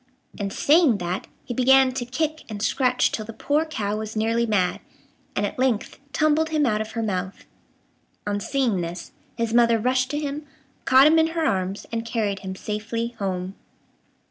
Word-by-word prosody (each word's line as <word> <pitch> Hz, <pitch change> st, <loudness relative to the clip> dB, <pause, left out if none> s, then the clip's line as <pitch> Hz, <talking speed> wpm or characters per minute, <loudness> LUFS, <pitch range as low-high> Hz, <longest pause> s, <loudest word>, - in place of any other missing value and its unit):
And, 200 Hz, -1 st, -2 dB
saying 295 Hz, -, +4 dB
that, 180 Hz, 0 st, -4 dB, 0.2 s
he 245 Hz, -, -4 dB
began 260 Hz, +1 st, +5 dB
to 255 Hz, -1 st, -4 dB
kick 310 Hz, +5 st, -2 dB
and 210 Hz, -2 st, -5 dB
scratch 250 Hz, +2 st, +2 dB
till 215 Hz, -, -3 dB
the 225 Hz, +2 st, -9 dB
poor 295 Hz, +7 st, 0 dB
cow 215 Hz, -9 st, -3 dB
was 220 Hz, 0 st, -5 dB
nearly 230 Hz, +2 st, +1 dB
mad, 190 Hz, -5 st, +1 dB, 0.6 s
and 205 Hz, -, +1 dB
at 205 Hz, -, -5 dB
length 255 Hz, -3 st, 0 dB
tumbled 310 Hz, +2 st, +2 dB
him 305 Hz, -2 st, +2 dB
out 215 Hz, -3 st, +1 dB
of 220 Hz, 0 st, -6 dB
her 230 Hz, -, -2 dB
mouth. 190 Hz, -2 st, -3 dB, 0.8 s
On 205 Hz, 0 st, -1 dB
seeing 235 Hz, -4 st, 0 dB
this, 170 Hz, 0 st, -6 dB, 0.3 s
his 230 Hz, -1 st, -1 dB
mother 235 Hz, -1 st, +5 dB
rushed 255 Hz, +3 st, +1 dB
to 295 Hz, -, -2 dB
him, 295 Hz, 0 st, -4 dB, 0.4 s
caught 265 Hz, +1 st, +7 dB
him 320 Hz, +2 st, +6 dB
in 320 Hz, -, +4 dB
her 325 Hz, -, +1 dB
arms, 190 Hz, -3 st, -1 dB
and 230 Hz, 0 st, -2 dB
carried 215 Hz, -4 st, -1 dB
him 190 Hz, -1 st, -6 dB
safely 225 Hz, +4 st, -3 dB
home. 185 Hz, -1 st, -3 dB
230 Hz, 180 wpm, -24 LUFS, 205-265 Hz, 0.8 s, caught